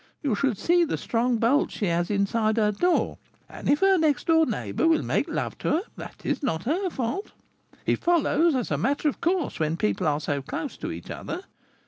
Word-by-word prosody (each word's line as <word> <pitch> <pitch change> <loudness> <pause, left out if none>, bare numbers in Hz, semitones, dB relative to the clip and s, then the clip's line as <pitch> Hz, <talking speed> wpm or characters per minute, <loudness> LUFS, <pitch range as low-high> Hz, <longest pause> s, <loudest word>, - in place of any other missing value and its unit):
You 275 -6 +1
should 225 +1 0
see 345 - +3
the 320 - -1
strong 240 +1 0
bolts 235 +6 +2
she 205 - -1
has 175 -1 0
inside 215 +2 +1
her 210 -2 +3
door; 350 - +1 0.3
and - - -6
if 290 - +3
her 385 -1 +5
next 300 -5 +1
door 320 -1 +4
neighbour 325 - -1
will 325 -1 +3
make - - 0
love - - -3
to - - -1
her, 320 - +2
that - - -10
is - - -1
not 185 - -1
her 360 +8 0
fault; 265 - -3 0.5
it - - +1
follows 335 -2 +3
as 245 -9 -2
a 145 - 0
matter 285 - 0
of - - -7
course 345 - 0
when 160 +1 0
people 105 - 0
are 145 -1 +1
so 145 -2 -2
close 155 - -5
to - - -5
each - - -8
other. 355 - -5
260 Hz, 210 wpm, -26 LUFS, 200-325 Hz, 0.5 s, her